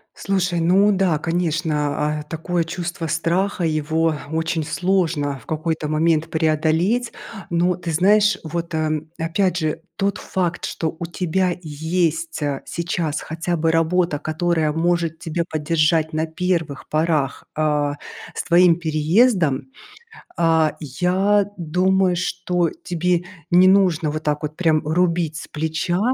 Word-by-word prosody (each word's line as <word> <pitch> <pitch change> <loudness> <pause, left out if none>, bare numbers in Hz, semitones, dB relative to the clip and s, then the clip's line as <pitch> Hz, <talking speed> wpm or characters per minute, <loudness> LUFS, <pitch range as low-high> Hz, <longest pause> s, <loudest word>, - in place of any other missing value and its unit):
Слушай, 185 -3 0
ну 190 +5 +4
да, 185 -5 +2
конечно. 155 -3 -1
А, - - -6
такое 170 +2 -2
чувство 170 0 -4
страха, 170 +4 0
его 160 +1 +1 0.2
очень 160 0 -1
сложно 165 -4 0
в 115 - -18
какой-то 160 0 -2
момент 160 +1 +1
преодолеть. 160 +9 +1 0.4
Но 175 +1 +1
ты 170 -2 -4
знаешь, 205 +6 +4
вот, 165 +1 -4
э, 155 -1 0 0.2
опять 175 +3 0
же 155 -2 -2 0.2
тот 200 -1 0
факт, 175 -2 -2
что 160 0 -3
у - - -4
тебя 180 +1 -1
есть, 160 - -1
а, 145 -2 -2
сейчас 170 -3 -2
хотя 165 +2 -3
бы 165 0 +1
работа, 165 0 +1
которая 155 0 0
может 165 0 0
тебе 170 +1 -2
поддержать 160 +1 +1
на 155 +1 0
первых 165 -3 -2
порах, 155 -3 0
а, 150 -2 +1 0.4
с - - -3
твоим 175 -1 +5
переездом. 165 - +2 0.7
А, 160 -2 +3
я 185 +8 +1
думаю, 180 +2 +2
что 180 -1 -1
тебе 175 - 0 0.3
не 180 +1 +6
нужно 185 -5 +3
вот 155 +1 -4
так 150 0 0
вот 150 0 -4
прям 160 -3 +2
рубить 165 -1 +1
с - - -8
плеча 160 +4 -2
165 Hz, 135 wpm, -21 LUFS, 155-180 Hz, 0.7 s, не